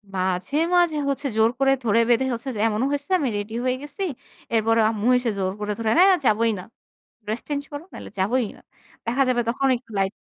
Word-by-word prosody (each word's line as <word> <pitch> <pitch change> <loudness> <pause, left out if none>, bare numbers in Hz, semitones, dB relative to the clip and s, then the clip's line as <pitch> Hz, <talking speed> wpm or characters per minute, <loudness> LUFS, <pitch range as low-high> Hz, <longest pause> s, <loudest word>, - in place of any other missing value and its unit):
মাঝে, 185 +7 -1 0.2
মাঝে, 345 -3 +3
হচ্ছে 280 +1 -1
জোর 220 0 +5
করে 270 0 +4
ধরে-বেঁধে 230 +3 +3
হচ্ছে 235 +3 -4
যে - - -4
এমনও 220 +3 0
হইছে 285 +2 -3
আমি 280 - 0
রেডি 205 +2 -5
হয়ে 255 0 +1
গেছি। 295 +7 -6 0.5
এরপরে 225 0 +3
আম্মু 220 0 -2
এসে 245 -1 -1
জোর 190 -1 0
করে 210 0 -2
ধরে 225 -1 0
"হ্যাঁ 375 +2 +7
যাবোই 225 +1 +3
না, - - -7 0.6
ড্রেস 220 +3 -3
চেঞ্জ 285 -1 -2
করো, 290 +1 -6
নাহলে - - -9
যাবোই 235 +5 +1
না"। - - -18 0.4
দেখা 245 +4 +2
যাবে 245 -1 +2
তখন 270 +3 0
একটু 235 -2 -19
লাইট 195 +1 0
230 Hz, 200 wpm, -23 LUFS, 215-275 Hz, 0.6 s, হ্যাঁ